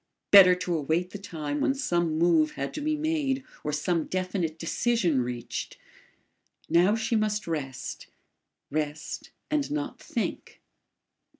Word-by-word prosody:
Better 185 -3 +10
to 180 -1 -2
await 160 +4 0
the 205 - -7
time 155 -6 -4
when 270 - +2
some 175 - 0
move 165 -2 +3
had 140 0 -4
to 300 - -4
be 305 +1 0
made 295 -4 0 0.2
or 150 - -1
some 160 +2 0
definite 185 -3 -2
decision 175 - +1
reached. 120 -1 -5 0.9
Now 175 +6 +4
she 225 +1 0
must 210 -2 0
rest, 145 -6 -4 0.6
rest 150 0 -3 0.2
and 295 -2 +1
not 290 -4 -3
think. 235 - -4
180 Hz, 130 wpm, -27 LUFS, 155-230 Hz, 0.9 s, Better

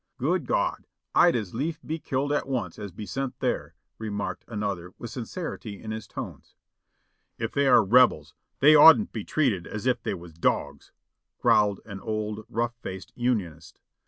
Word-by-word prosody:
"Good - - 0
God! - - 0 0.3
I'd 175 - +5
as 105 -6 -3
lief 155 +7 -2
be 160 +1 -3
killed 140 0 -1
at 145 - -1
once 120 -11 -3
as 100 -2 -6
be 105 +4 -8
sent 135 +3 -4
there," - - -2 0.2
re 110 -1 -4
marked 100 0 -4
another 100 -5 -4
with 120 - -7
sincerity 120 - -6
in 110 - -7
his 110 0 -6
tones. - - -8 0.8
"If 115 -1 -3
they 140 -1 +2
are 125 -3 +6
Rebels, 115 -9 +4 0.3
they 150 +3 +8
oughtn't 160 +8 +8
to - - -42
be - - -5
treated 120 - 0
as 105 +2 -6
if 125 -2 +1
they - - -2
was 85 -2 -11
dogs," 85 - -1 0.5
growled 105 -2 +3
an 100 -3 -8
old 110 0 -4
rough 115 +1 -1
faced 95 -4 -7
Unionist. 110 - -2
110 Hz, 175 wpm, -26 LUFS, 100-135 Hz, 0.8 s, they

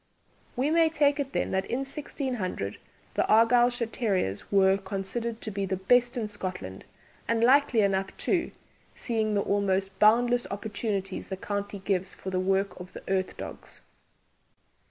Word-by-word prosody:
We 270 +5 +1
may 330 0 +4
take 290 -2 +2
it 275 -1 -2
then - - -1
that 190 0 0
in 250 - -1
1600 260 - -4 0.3
the - - +1
Argyllshire 240 +2 +4
terriers 185 - -1
were 195 -1 +4
considered 200 +4 -3
to 215 - -4
be 200 -1 -2
the 190 0 -1
best 245 +6 +3
in 225 -3 -1
Scotland, 185 - -6 0.4
and 230 0 +1
likely 260 -2 +5
enough 195 -1 0
too, 345 -3 0 0.5
seeing 220 -3 -1
the 200 - +2
almost 195 -1 0
boundless 240 +3 +4
opportunities 200 -1 -3
the 190 - -5
county 200 +1 -4
gives 190 -1 -2
for 190 - -6
the 185 - 0
work 195 +1 0
of 180 0 -10
the - - -9
"earth 190 -1 -1
dogges." - - -9
205 Hz, 155 wpm, -28 LUFS, 190-245 Hz, 0.5 s, likely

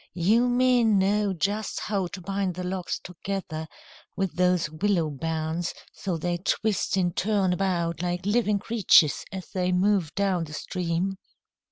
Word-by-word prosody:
"You 220 +8 +3
men 245 -3 +4
know 200 +1 +2
just 200 +5 -2
how 195 -3 -1
to 185 +2 -8
bind 195 0 -2
the 180 - -4
logs 180 0 -3
together 180 -3 -5 0.5
with 195 -2 -1
those 180 -2 +2
willow 165 0 0
bands, 160 +3 -3 0.2
so 185 -4 -3
they 175 +2 -1
twist 200 +1 0
and 175 -2 +1
turn 195 -2 +1
about 170 -3 -1
like 180 0 -2
living 210 0 +2
creatures 200 -8 +4
as 190 -2 -7
they 180 -1 0
move 185 -3 +1
down 190 -4 +1
the 150 - -11
stream." 180 +3 -2
185 Hz, 150 wpm, -26 LUFS, 175-200 Hz, 0.5 s, men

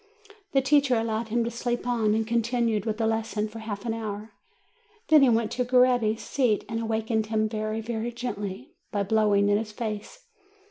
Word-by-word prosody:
The 270 -1 +3
teacher 280 -1 +4
allowed 225 0 -1
him 235 +2 +1
to 235 - -3
sleep 240 +1 -2
on, 225 -4 +1
and 220 0 0
continued 230 -2 0
with 215 -1 -1
the 225 - 0
lesson 220 -1 -1
for 220 +1 -9
half 210 -2 -6
an 230 - -1
hour. 215 -1 -5 0.8
Then 310 -2 +7
he 270 - +6
went 230 -1 +1
to 250 - 0
Coretti's 245 -3 +3
seat, 245 -7 +1
and 225 - -3
awakened 220 -1 -1
him 220 0 +1
very, 215 0 -3
very 230 +1 -3
gently, 205 - -5 0.2
by 205 -1 0
blowing 205 -1 +3
in 205 0 +3
his 220 -1 -5
face. 220 - -6
225 Hz, 185 wpm, -26 LUFS, 215-240 Hz, 0.8 s, Then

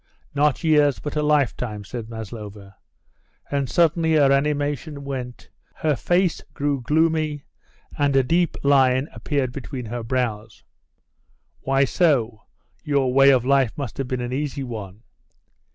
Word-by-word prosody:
"Not 145 +2 +1
years, 150 -4 +3
but 150 - -6
a 150 - +1
lifetime," 125 -8 0
said 115 +2 -7
Maslova. 105 -3 -9 0.8
And 140 -3 -1
suddenly 165 +1 +2
her 140 -3 +5
animation 145 +1 -1
went, 125 -3 -7 0.2
her 155 -2 0
face 175 +5 +1
grew 140 -2 -1
gloomy, 155 +1 +1 0.6
and 145 -1 +2
a 135 - +5
deep 170 +5 +1
line 135 0 +3
appeared 140 -4 -2
between 130 -1 -6
her 120 +2 -5
brows. 115 -3 -3 1.0
"Why 135 +1 +2
so? 125 -9 +1 0.4
Your 140 -3 +1
way 135 +1 +6
of 130 -3 +4
life 135 -3 +2
must 140 -5 -5
have 135 - -2
been 130 -1 -3
an 120 +1 -4
easy 140 0 -3
one." 110 -4 -8
135 Hz, 135 wpm, -23 LUFS, 120-150 Hz, 1.0 s, way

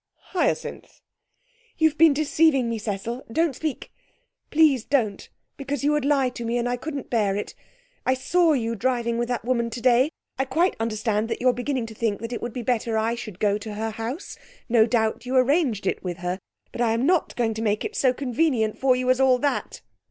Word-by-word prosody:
'Hyacinth!' 365 - -2 0.8
'You've 315 -1 +3
been 320 0 +6
deceiving 295 -2 +2
me, 230 -1 -2
Cecil. 220 +4 -4
Don't 320 +1 +1
speak 310 -1 -4 0.6
please 295 -6 +4
don't 230 -8 -1 0.3
because 280 0 -4
you 295 - +3
would 300 -2 +1
lie 275 -3 +3
to 245 -1 -7
me, 230 +1 -1
and 240 0 0
I 245 - 0
couldn't 280 +2 -6
bear 210 -5 +1
it. 205 - -4 0.5
I 260 - +2
saw 330 +5 +2
you 230 -4 -1
driving 235 0 0
with 240 - 0
that 245 -2 -3
woman 235 -2 0
today. 245 +3 +3 0.3
I 265 - +2
quite 325 +8 +1
understand 220 -1 -1
that - - -2
you're 255 0 +3
beginning 250 -1 -2
to 225 - -9
think 215 -2 -1
it 230 0 -4
would 240 - -4
be 245 +1 -5
better 230 -2 0
I 225 +1 +1
should 220 -6 -7
go 205 0 +1
to 210 0 -7
her 220 +1 -2
house. 230 - -6 0.3
No 230 -2 +4
doubt 225 +1 0
you 260 - -1
arranged 255 - +2
it - - -1
with 175 -2 -4
her. 180 +2 -3 0.3
But - - -5
I'm 230 +1 +2
not 350 0 +1
going 230 -2 0
to 220 - -5
make 210 -1 0
it 435 - -5
so 260 - +3
convenient 250 -4 0
for 260 -1 +4
you 250 0 -2
as 255 - +1
all 260 -1 +5
that!' 285 +3 -2
245 Hz, 205 wpm, -24 LUFS, 225-275 Hz, 0.8 s, been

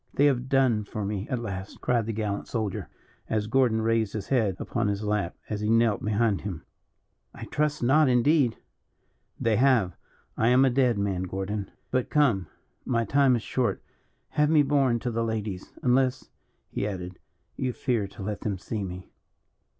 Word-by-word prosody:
"They 145 - +4
have 130 -2 +1
done 130 -6 +3
for 105 0 -5
me 100 0 -3
at 125 - 0
last," 100 -4 -6
cried 120 -3 0
the - - -1
gallant 105 -2 -3
soldier, 110 -5 -3 0.4
as 110 -1 0
Gordon 115 -1 +2
raised 115 -2 +1
his 105 -3 -5
head 110 -8 +2
upon 115 -3 -2
his 100 +1 -1
lap, 105 -4 -1
as 105 -1 -3
he 105 - 0
knelt 115 -2 +3
behind 105 -1 +1
him. 90 -6 -5 0.7
"I - - -7
trust 150 -2 -1
not, 145 +3 +5
indeed." 125 0 +3 0.8
"They 115 -2 +2
have. 120 -9 +3 0.4
I 115 - +1
am 125 +2 +5
a 130 - +3
dead 125 -3 +2
man, 100 -3 -1
Gordon. 95 +2 -4 0.2
But 130 -1 0
come, 125 -12 +2 0.4
my 115 -2 0
time 135 -1 +4
is 115 - -3
short; 125 -2 -1 0.5
have 150 0 +2
me 155 -2 +5
borne 135 -4 +2
to 125 - -2
the 115 0 -1
ladies 105 -4 -4
unless," 130 +1 +1 0.4
he 100 - -2
added, 90 -3 -6 0.4
"you 130 -1 -1
fear 120 -5 -1
to 100 - -10
let 105 +1 -4
them 100 -3 -2
see 105 +3 -4
me." 90 0 -7
115 Hz, 175 wpm, -27 LUFS, 100-130 Hz, 0.8 s, not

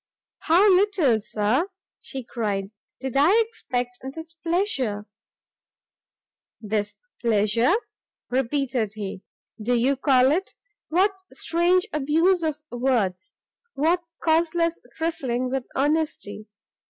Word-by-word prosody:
"How 350 +6 +4
little, 365 - +4
Sir," 215 - 0 0.3
she 265 -1 -6
cried, 205 -5 -2 0.3
"did 265 -1 -4
I 330 +11 +5
expect 245 - -4 0.2
this 325 0 -8
pleasure." 325 - -1 1.5
"This 210 -1 -2 0.2
pleasure," 230 - +3 0.6
repeated 255 -4 0
he, 195 -3 -5 0.4
"do 245 +3 +1
you 255 +4 +2
call 265 -1 +4
it? 370 +6 -1 0.3
what 380 +5 +3 0.2
strange 350 +2 +2
abuse 325 +5 +2
of 305 -2 -2
words! 230 -8 -1 0.4
what 330 +5 +2 0.2
causeless 335 +1 +2
trifling 260 -7 -2
with 265 -2 -2
honesty! 290 -7 -1
270 Hz, 100 wpm, -24 LUFS, 235-330 Hz, 1.5 s, I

